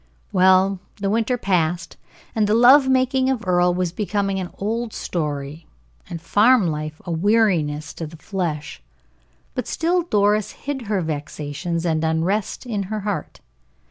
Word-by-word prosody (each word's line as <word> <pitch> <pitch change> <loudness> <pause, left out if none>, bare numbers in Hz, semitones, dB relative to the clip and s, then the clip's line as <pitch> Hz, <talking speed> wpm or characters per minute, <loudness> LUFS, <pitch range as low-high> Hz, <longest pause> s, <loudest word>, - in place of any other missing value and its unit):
Well, 190 +1 +4 0.2
the 200 -1 -2
winter 230 +3 +1
passed, 175 -5 -1 0.4
and 215 -2 +1
the 210 - +3
love 265 +4 +7
making 260 0 +2
of 250 -7 -2
Earle 180 0 +3
was 180 -1 -1
becoming 200 0 -1
an 180 -2 -4
old 225 +2 -2
story, 150 -1 -4 0.4
and 170 - -5
farm 215 +6 +4
life 155 -1 -3
a 175 - -4
weariness 170 -5 +1
to 165 - -6
the 165 +2 -12
flesh, 155 - -4 0.7
but 250 - -4
still 350 +2 +1
Doris 210 - +1
hid 270 -5 -5
her 205 -3 0
vexations 155 +2 -4
and 160 -1 0
unrest 170 +10 -1
in 215 -5 -2
her 215 -1 -3
heart. 205 0 -4
190 Hz, 145 wpm, -22 LUFS, 165-220 Hz, 0.7 s, love